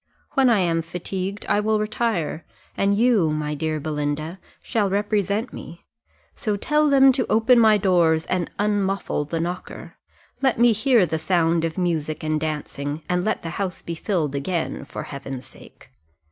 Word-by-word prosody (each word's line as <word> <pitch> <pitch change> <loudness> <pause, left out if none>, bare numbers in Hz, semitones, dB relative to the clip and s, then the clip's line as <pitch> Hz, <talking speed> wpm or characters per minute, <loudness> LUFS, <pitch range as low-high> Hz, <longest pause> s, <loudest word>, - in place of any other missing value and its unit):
When 270 -3 +4
I 220 -5 +4
am 165 -2 +1
fatigued, 185 +4 -5
I - - +2
will 215 +1 +1
retire, 215 -7 -1 0.3
and 200 0 +2
you, 225 -8 +3
my 150 0 -2
dear 155 +1 -2
Belinda, 150 +3 -3 0.2
shall 215 -5 0
represent 205 +2 0
me; 170 +1 -10 0.5
so 210 -2 -2
tell 300 +7 +2
them 270 -1 +7
to 255 -1 -1
open 230 +3 +5
my 220 -2 +6
doors, 170 -5 +2
and 180 -2 -1
unmuffle 195 -7 -1
the 165 - -1
knocker: 175 +2 -6 0.4
let 265 -3 +2
me 240 +1 +5
hear 225 -1 +3
the 160 -1 -2
sound 165 -1 +1
of 165 -1 -2
music 160 -4 -1
and 155 0 0
dancing, 150 -1 -4
and 180 0 0
let 215 - -1
the 165 - -4
house 190 -2 -4
be 170 - -4
filled 165 -4 -1
again, 145 +1 -2
for - - -6
Heaven's 135 -2 -7
sake. 130 - -17
180 Hz, 165 wpm, -23 LUFS, 160-215 Hz, 0.5 s, them